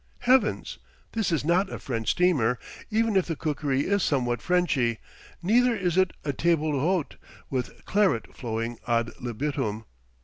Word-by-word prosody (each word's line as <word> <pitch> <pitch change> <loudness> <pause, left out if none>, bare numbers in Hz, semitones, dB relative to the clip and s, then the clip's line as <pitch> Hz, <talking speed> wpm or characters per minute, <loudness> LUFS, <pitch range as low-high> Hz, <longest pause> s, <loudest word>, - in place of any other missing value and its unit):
Heavens! 250 -3 +2 0.3
this 220 -5 -1
is 155 -3 0
not 185 +4 +2
a - - -4
French 115 -5 -3
steamer, 140 -10 +3 0.3
even 225 -1 +1
if 190 - +3
the 165 - -2
cookery 145 -3 -1
is 200 +5 +1
somewhat 120 -6 0
Frenchy; 150 -10 +1 0.5
neither 240 +5 +4
is 180 -5 -1
it 185 -1 +3
a 145 - -1
table 160 +1 +1
d'hote 155 +4 0 0.3
with 125 -3 -4
claret 195 - +1
flowing 115 -1 -3
ad 115 0 +1
libitum. 120 -3 -2
155 Hz, 145 wpm, -26 LUFS, 125-185 Hz, 0.5 s, neither